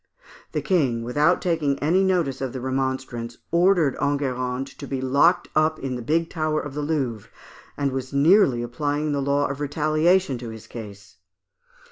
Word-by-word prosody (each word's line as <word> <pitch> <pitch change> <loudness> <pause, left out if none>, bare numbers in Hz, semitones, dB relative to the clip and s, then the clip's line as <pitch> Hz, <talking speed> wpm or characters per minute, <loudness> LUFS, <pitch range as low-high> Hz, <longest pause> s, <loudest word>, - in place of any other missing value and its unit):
The - - -1
King, 135 - +1
without 150 +9 +2
taking 160 -6 0
any 175 +7 +2
notice 170 -9 0
of 130 -2 -3
the 130 - -4
remonstrance, 130 -2 -3
ordered 170 -4 +3
Enguerrand 130 -2 -1
to 140 - -7
be 135 -1 -3
locked 140 +7 +3
up 155 +1 +2
in 135 -3 -4
the 125 - -5
big 165 +7 0
tower 155 -2 -1
of 145 -2 -6
the 150 - -3
Louvre, 135 -8 -2 0.5
and 140 -1 0
was 130 -1 -4
nearly 140 - +4
applying 145 +5 -2
the 140 -1 0
law 140 +1 +1
of 140 0 -4
retaliation 155 +1 +1
to 120 -1 -7
his 110 -1 -10
case. 105 -3 -10
140 Hz, 165 wpm, -24 LUFS, 130-155 Hz, 0.5 s, nearly